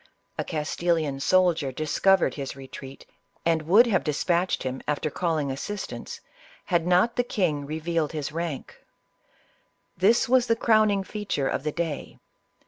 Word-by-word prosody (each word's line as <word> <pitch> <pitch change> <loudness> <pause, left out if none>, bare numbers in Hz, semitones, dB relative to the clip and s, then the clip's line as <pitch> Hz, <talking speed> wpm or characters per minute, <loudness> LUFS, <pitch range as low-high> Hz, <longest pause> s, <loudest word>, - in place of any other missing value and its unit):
A - - -2
Castilian 155 -2 -1
soldier 170 -3 +2
discovered 165 +7 +2
his 135 -2 -5
retreat, 135 0 -10 0.4
and 165 -1 +2
would 210 +8 +7
have 205 -6 +1
dispatched 170 +4 0
him 130 0 -4
after 150 +1 -1
calling 155 -5 -1
assistance, 200 +9 -6 0.4
had 175 -3 +1
not 185 +7 +3
the 245 - +3
king 155 -11 -1
revealed 160 0 -1
his 150 -3 -4
rank. 165 -3 -5 1.1
This 200 +6 +3
was 250 0 +3
the 230 - +3
crowning 215 -3 +3
feature 195 -9 -2
of - - -1
the 150 +2 -2
day. 165 -2 -4
165 Hz, 135 wpm, -26 LUFS, 150-190 Hz, 1.1 s, would